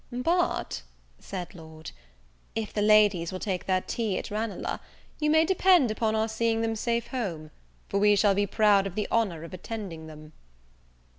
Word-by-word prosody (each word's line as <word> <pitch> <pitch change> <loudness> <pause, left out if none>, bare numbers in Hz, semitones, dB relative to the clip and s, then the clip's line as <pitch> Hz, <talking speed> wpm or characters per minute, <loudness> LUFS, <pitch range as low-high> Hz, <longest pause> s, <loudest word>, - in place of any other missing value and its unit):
"But," 330 - 0 0.4
said 180 -2 -7
Lord, 160 -2 -11 0.6
"if 220 -2 -3
the 210 - 0
ladies 205 -5 +4
will 185 - -4
take 190 -3 -3
their 185 -1 +2
tea 220 -2 -2
at - - -5
Ranelagh, 210 -2 -3 0.4
you 300 0 +1
may 315 +1 +5
depend 365 - +4
upon 220 0 0
our 220 0 +1
seeing 225 0 0
them 225 0 0
safe 235 +1 -1
home; 170 -12 -4 0.4
for 200 - 0
we 205 0 +5
shall 200 0 +4
be 205 +1 +1
proud 200 -1 +3
of 190 - -8
the 210 - -1
honour 195 -9 0
of 165 - -10
attending 185 -4 -6
them." 155 0 -12
210 Hz, 170 wpm, -27 LUFS, 185-230 Hz, 0.6 s, may